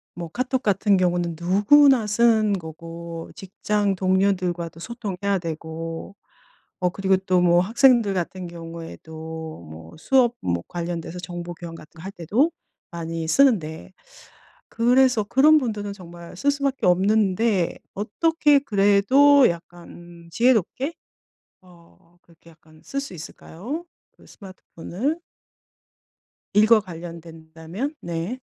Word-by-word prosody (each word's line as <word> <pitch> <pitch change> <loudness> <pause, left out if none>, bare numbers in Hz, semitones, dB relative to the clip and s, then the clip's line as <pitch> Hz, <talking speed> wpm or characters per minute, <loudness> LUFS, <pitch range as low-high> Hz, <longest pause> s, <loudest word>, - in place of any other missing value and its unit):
뭐 170 -2 -6
카톡 255 +5 -2
같은 200 -2 +2
경우는 175 -2 0
누구나 215 +7 +4
쓰는 220 -1 +3
거고 165 -1 -7
직장 200 +1 -1
동료들과도 185 -3 0
소통해야 200 -3 -3
되고 165 +2 -6 0.6
어 180 - +1
그리고 190 +1 +1
또 185 -1 +1
뭐 175 0 +4
학생들 235 0 +3
같은 185 0 -4
경우에도 160 - -9
뭐 80 +1 -12
수업 240 +7 +2
뭐 85 -1 -2
관련돼서 170 0 -5
정보 175 -1 -7
교환 170 0 -9
같은 155 -2 -13
거 - - -11
할 195 - -6
때도 215 - 0 0.4
많이 165 -1 -5
쓰는데 180 - +1 0.8
그래서 245 -1 +3
그런 285 +8 +5
분들은 210 -6 -4
정말 175 -2 -12
쓸 285 - +2
수밖에 275 -4 -2
없는데 195 0 +2 0.2
어떻게 295 - +2
그래도 255 +5 +4
약간 170 0 -8
음 170 -1 -14
지혜롭게? 250 - +1 0.7
어 175 -1 -22
그렇게 165 0 -21
약간 155 -1 -22
쓸 275 - -4
수 275 - -8
있을까요 210 - -8 0.3
그 - - -22
스마트폰을? 195 - -6 1.3
일과 215 +2 +6
관련된다면 165 - -8
네. 170 +9 -4
185 Hz, 255 characters per minute, -23 LUFS, 170-225 Hz, 1.3 s, 일과